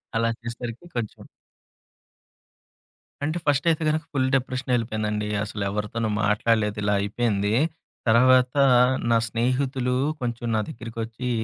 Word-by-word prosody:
అలా 115 0 +2
చేసేసరికి 115 +4 -6
కొంచెం. 115 -3 -4 2.0
అంటే, 155 +4 -1
ఫస్ట్ 145 +1 +2
అయితే 160 0 -1
గనుక 155 +1 0
ఫుల్ 130 -2 +1
డిప్రెషనెళ్లిపోయానండి. 115 -5 -1 0.2
అసలు 105 -1 -4
ఎవరితోనూ 105 +2 -2
మాట్లాడలేదు 105 0 +1
ఇలా 105 0 +2
అయిపోయింది. 105 -1 0 0.5
తర్వాత 125 +2 +5 0.6
నా 115 - +5
స్నేహితులు 125 +2 0 0.3
కొంచెం 120 -1 -3
నా 110 - +2
దగ్గరికొచ్చి, 115 +1 -5
115 Hz, 105 wpm, -24 LUFS, 110-130 Hz, 2.0 s, తర్వాత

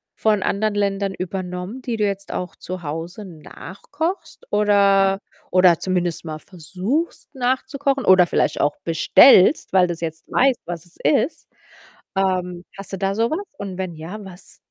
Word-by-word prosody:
von 210 -3 +1
anderen 210 +1 0
Ländern 200 -1 0
übernommen, 185 +5 -5
die 235 -3 -3
du 215 - 0
jetzt 200 -1 -4
auch 180 -1 -5
zu 185 -1 -7
Hause 165 +7 -6
nachkochst 285 - -6
oder 200 -2 +3 0.3
oder 180 -2 +5
zumindest 180 -3 -1
mal 155 -1 -5
versuchst 190 - -4
nachzukochen 265 +2 -1
oder 185 -1 +7
vielleicht - - 0
auch 145 0 +1
bestellst, 185 - +5
weil 185 -1 +5
du's 170 -1 -5
jetzt 160 -1 -5
weißt, 260 -2 +3
was 170 -1 -6
es 175 - -19
ist? 295 +3 +1 0.7
Ähm, 180 -2 -1
hast 195 0 -9
du - - -2
da 195 +1 -1
so 230 +2 +1
was 390 +6 -3
und 195 -2 -6
wenn 185 -3 -4
ja, 175 +7 -8
was? 190 0 -13
190 Hz, 155 wpm, -21 LUFS, 180-215 Hz, 0.7 s, oder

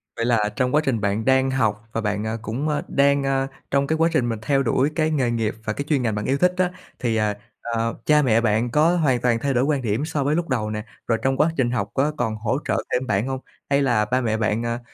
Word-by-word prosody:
Vậy 115 - -1
là 110 -3 +2
trong 125 +1 +1
quá 150 - +4
trình 120 -5 0
bạn 100 +2 -1
đang 130 0 +3
học 115 -3 -1
và 115 - -2
bạn, 105 0 -2
à, 110 +1 -2
cũng, 120 +8 -3
a, 150 -1 0
đang, 140 0 +3
a, 135 0 0 0.2
trong 140 0 +2
cái 160 - 0
quá 165 +1 +3
trình 125 -7 +1
mình 115 -2 -3
theo 135 +3 +1
đuổi 135 +3 +2
cái 155 -1 +1
nghề 130 -6 +1
nghiệp 115 -2 -1
và 110 - -1
cái 140 - -3
chuyên 145 -4 +2
ngành 110 -4 0
bạn 105 - -3
yêu 135 +1 +1
thích 180 +2 +3
á, 180 -1 +1 0.3
thì, 115 -3 0
à, 105 -1 +1 0.3
ờ, 115 -1 -2
cha 150 0 +5
mẹ 115 -4 +3
bạn 115 +1 +1
có 160 +5 +3
hoàn 130 -7 +2
toàn 120 -2 +2
thay 140 -1 0
đổi 125 - +2
quan 145 -1 +1
điểm 115 +5 -1
so 155 -3 -2
với 145 +2 +1
lúc 170 -2 -2
đầu 110 -4 -1
nè? 105 0 -4 0.2
Rồi 115 - +2
trong 135 0 +1
quá 155 +2 +3
trình 120 -3 +1
học 110 -4 -1
có 140 +3 +1
còn 110 -1 -1
hỗ 110 +4 -1
trợ - - 0
thêm 125 +1 0
bạn 105 +4 0
hông? 130 -1 -3 0.3
Hay 140 0 +3
là 120 -6 +2
ba 125 +4 0
mẹ 110 -2 0
bạn, 110 +1 0
à, 115 0 -2
125 Hz, 275 wpm, -23 LUFS, 110-140 Hz, 0.3 s, cha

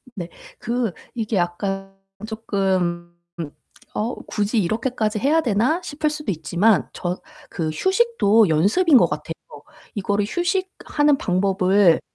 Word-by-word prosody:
네 175 -3 -5 0.3
그 235 -2 -1 0.2
이게 225 -1 -2
약간 195 +2 -2 0.3
쪼끔 185 -6 -1 0.8
'어 225 +4 -2
굳이 215 +2 0
이렇게까지 220 +2 -1
해야 300 +8 +3
되나?' 250 - +1
싶을 305 0 -1
수도 300 -8 -3
있지만 180 +5 +2
저 180 0 -3 0.3
그 160 -3 -2
휴식도 230 - +3
연습인 230 - +4
것 - - +4
같아요. - - -4 0.6
이거를 205 0 0
휴식하는 350 - 0
방법을 190 -2 +3
210 Hz, 240 characters per minute, -22 LUFS, 185-265 Hz, 0.8 s, 연습인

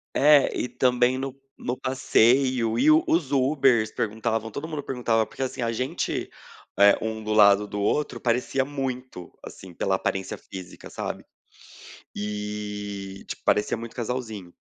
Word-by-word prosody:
É, 145 0 +6
e - - -1
também 125 +1 +2
no 135 0 -4 0.3
no 125 - -2
passeio 130 -2 +2
e - - +3
e - - +6
os 155 -2 +2
Ubers 130 -5 +3
perguntavam, 110 0 -2
todo 140 +8 -6
mundo 155 -3 -4
perguntava, 120 -4 0
porque - - -10
assim 130 -1 -4
a 115 0 0
gente, 130 +3 -2 0.5
eh, 100 0 +7
um 110 0 -3
do 110 0 -2
lado 105 -1 +6
do 100 0 -4
outro 130 +3 0
parecia 125 +2 +1
muito 130 -8 -5 0.2
assim 95 -2 -11
pela 95 +2 0
aparência 95 0 -2
física, 95 -2 -10
sabe. - - -5 0.9
E, 105 -1 -5
tipo - - -7
parecia 105 +2 +2
muito 115 0 -8
casalzinho. 115 -6 -4
115 Hz, 145 wpm, -25 LUFS, 105-130 Hz, 0.9 s, eh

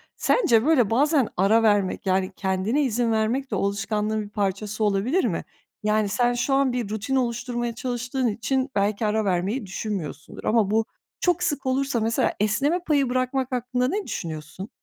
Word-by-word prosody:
sence 240 - +3
böyle 275 -9 +4
bazen 280 +1 +3
ara 210 +5 +4
vermek, 205 -4 +2
yani 190 0 +1
kendine 195 +9 0
izin 240 -2 0
vermek 230 +5 0
de, - - 0
o 200 +1 +1
alışkanlığın 210 +2 -1
bir 205 - -10
parçası 205 +1 -2
olabilir 215 - +1
mi? - - -1 0.4
Yani, 210 -1 +1
sen 245 +3 +2
şu 255 +3 0
an 270 -2 +2
bir 240 -5 -2
rutin 220 +5 -2
oluşturmaya 240 -1 -1
çalıştığın 245 +1 -2
için 255 +5 -1
belki 205 +2 +1
ara 215 0 +1
vermeyi 195 +6 0
düşünmüyorsundur 190 - -5
ama 215 -3 +2
bu 220 +1 +2 0.3
çok 355 -1 +1
sık 290 -5 -1
olursa 265 -1 0
mesela 225 +1 +1
esneme 270 - +1
payı 280 -5 +2
bırakmak 255 +1 -1
hakkında 250 0 0
ne 400 +9 -1
düşünüyorsun? 160 +5 -6
225 Hz, 165 wpm, -24 LUFS, 205-260 Hz, 0.4 s, böyle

